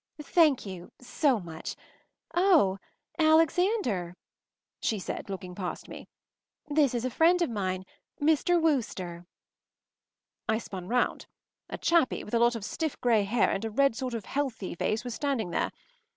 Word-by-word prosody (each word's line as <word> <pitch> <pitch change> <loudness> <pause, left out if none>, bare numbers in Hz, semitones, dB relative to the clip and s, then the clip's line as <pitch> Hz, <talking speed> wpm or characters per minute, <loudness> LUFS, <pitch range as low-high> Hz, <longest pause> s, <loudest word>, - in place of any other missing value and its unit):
” - - -49
“Thank 300 -4 +3
you, 185 -3 -8
so 250 0 +1
much. 165 -3 -7 0.6
Oh 335 - +4 0.4
Alexander,” 315 - +2 0.6
she 220 - 0
said, 195 - -5
looking 185 -2 -6
past 180 -1 -5
me, - - -10 0.6
“this 290 -4 +2
is 240 +1 -1
a 255 - -1
friend 340 +7 +4
of 325 - -2
mine—Mr. 230 - 0
Wooster.” 190 - -1 1.2
I 220 - +3
spun 190 -5 -7
round. 245 +3 0 0.4
A - - -5
chappie 335 -6 +2
with 210 - -11
a 235 - +3
lot 235 0 +4
of 215 -3 -5
stiff 315 +3 -3
grey 225 -4 +3
hair 220 +3 +2
and 195 - -2
a 225 - -2
red 275 +2 +2
sort 255 -1 -3
of 220 -4 -5
healthy 270 -9 -3
face 215 +6 -1
was 245 -2 -5
standing 260 - -1
there. - - 0
240 Hz, 150 wpm, -28 LUFS, 195-300 Hz, 1.2 s, Oh